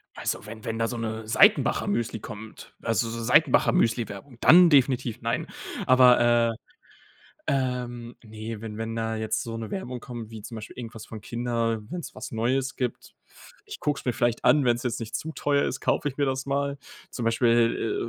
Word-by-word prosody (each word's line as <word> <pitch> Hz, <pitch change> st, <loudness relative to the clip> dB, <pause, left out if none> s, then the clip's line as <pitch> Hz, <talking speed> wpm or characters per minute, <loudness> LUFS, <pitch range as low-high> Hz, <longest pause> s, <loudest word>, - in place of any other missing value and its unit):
Also -, -, -3 dB
wenn 110 Hz, +1 st, -10 dB
wenn 115 Hz, 0 st, -3 dB
da 115 Hz, -, +1 dB
so 120 Hz, -, -4 dB
'ne 110 Hz, -1 st, -4 dB
Seitenbacher-Müsli 190 Hz, -, +3 dB
kommt, 110 Hz, +1 st, -10 dB
also 115 Hz, 0 st, 0 dB
so 115 Hz, 0 st, -5 dB
Seitenbacher-Müsli-Werbung, 115 Hz, +2 st, +2 dB
dann 175 Hz, +1 st, +8 dB
definitiv 130 Hz, -5 st, +2 dB
nein. 115 Hz, +1 st, -1 dB, 0.4 s
Aber, 125 Hz, -1 st, +6 dB, 0.3 s
äh, -, -, -10 dB, 1.0 s
ähm, 125 Hz, -3 st, -2 dB
ne, 110 Hz, -1 st, -7 dB
wenn 110 Hz, -2 st, -7 dB
wenn 115 Hz, +1 st, -4 dB
da 110 Hz, -1 st, -2 dB
jetzt 110 Hz, 0 st, -1 dB
so 115 Hz, -1 st, -5 dB
'ne 115 Hz, -1 st, -6 dB
Werbung 130 Hz, -10 st, -4 dB
kommt, 120 Hz, -3 st, -8 dB
wie 110 Hz, -2 st, -9 dB
zum 115 Hz, -, -9 dB
Beispiel 110 Hz, -, -9 dB
irgendwas 115 Hz, -3 st, -8 dB
von 110 Hz, -, -8 dB
Kindern, 115 Hz, -1 st, -2 dB
wenn's 180 Hz, -1 st, -6 dB
was -, -, -7 dB
Neues 130 Hz, +4 st, -1 dB
gibt. 125 Hz, -2 st, -4 dB, 0.5 s
Ich -, -, -9 dB
gucke 145 Hz, -1 st, 0 dB
es -, -, -10 dB
mir 125 Hz, -, +1 dB
vielleicht 120 Hz, 0 st, 0 dB
an. 140 Hz, +3 st, +5 dB
Wenn's 120 Hz, -1 st, +2 dB
jetzt 125 Hz, -1 st, -2 dB
nicht 115 Hz, -1 st, -4 dB
zu 160 Hz, -, -6 dB
teuer 145 Hz, -2 st, +1 dB
ist, 130 Hz, -, -3 dB
kaufe -, -, +1 dB
ich 135 Hz, -, -8 dB
mir 140 Hz, -, +2 dB
das 130 Hz, 0 st, -2 dB
mal. 140 Hz, 0 st, -1 dB, 0.3 s
Zum 120 Hz, -, -5 dB
Beispiel, 115 Hz, 0 st, +2 dB
120 Hz, 180 wpm, -26 LUFS, 115-130 Hz, 1.0 s, dann